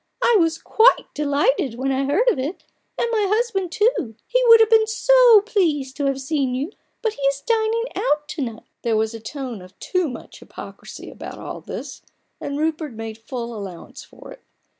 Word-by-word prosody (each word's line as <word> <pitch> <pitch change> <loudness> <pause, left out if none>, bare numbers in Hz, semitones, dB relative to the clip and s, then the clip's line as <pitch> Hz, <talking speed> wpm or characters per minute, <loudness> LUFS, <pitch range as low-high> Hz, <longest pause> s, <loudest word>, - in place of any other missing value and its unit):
I 475 - +4
was 325 -1 +2
quite 455 +8 +3
delighted 285 -4 +1
when 265 +3 -1
I 270 +1 0
heard 350 - +1
of 405 - -3
it, 290 +8 -4 0.3
and - - 0
my 430 -3 +1
husband 420 -5 0
too. 375 - 0
He - - +1
would 460 -1 +9
have 445 -1 +5
been 440 -1 +5
so 485 -1 +6
pleased 315 - 0
to 285 - -1
have 270 -1 -1
seen 270 -2 -1
you, 285 +8 -3 0.3
but 445 -2 0
he 285 - -12
is 275 0 0
dining 455 0 +1
out 295 -10 0
to - - -4
night." 230 -4 -5 0.2
There 230 -2 +1
was 220 +1 0
a 225 - -7
tone 245 -2 -6
of 185 +1 -15
too 365 -4 -1
much 250 - -10
hypocrisy - - -10
about - - -9
all - - -7
this, - - -8 0.4
and 285 0 -4
Rupert 310 -2 -2
made 225 0 -7
full 235 +1 -6
allowance 195 -5 -9
for - - -14
it. - - -13
295 Hz, 195 wpm, -22 LUFS, -, 0.4 s, would